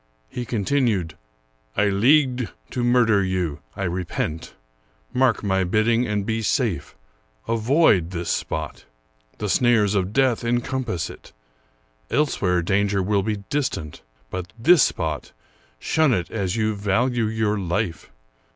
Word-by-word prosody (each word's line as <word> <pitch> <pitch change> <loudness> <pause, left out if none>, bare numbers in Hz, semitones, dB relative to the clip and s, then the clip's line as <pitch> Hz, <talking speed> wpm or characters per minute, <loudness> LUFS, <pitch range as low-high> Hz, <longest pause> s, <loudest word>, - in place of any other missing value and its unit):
He 125 - -5
continued, 110 - 0 0.3
" - - -35
I 105 0 +3
leagued 125 +2 +3 0.2
to 125 - -2
murder 120 -4 +3
you. 90 -5 -2 0.2
I 100 - -4
repent. 85 -3 -3 0.6
Mark 125 -4 +2
my 95 -2 +1
bidding, 115 +6 +2
and 105 -2 -1
be 115 +1 -1
safe. 105 - -1 0.5
Avoid 115 - +3
this 85 -2 -3
spot. 75 -2 -4 0.5
The 105 - -3
snares 110 -2 +3
of 95 -1 0
death 130 -1 +2
encompass 120 - -1
it. - - -15 0.8
Elsewhere 90 - +1
danger 100 +1 +1
will 100 +1 +1
be 105 0 -3
distant; 130 - -2 0.3
but 95 -1 -5
this 160 +7 +5
spot, 80 - -1 0.4
shun 155 - +2
it 90 -2 -3
as 95 -5 -2
you 110 -1 +1
value 115 +4 0
your 110 -1 0
life. 90 -1 -2
105 Hz, 130 wpm, -23 LUFS, 90-120 Hz, 0.8 s, this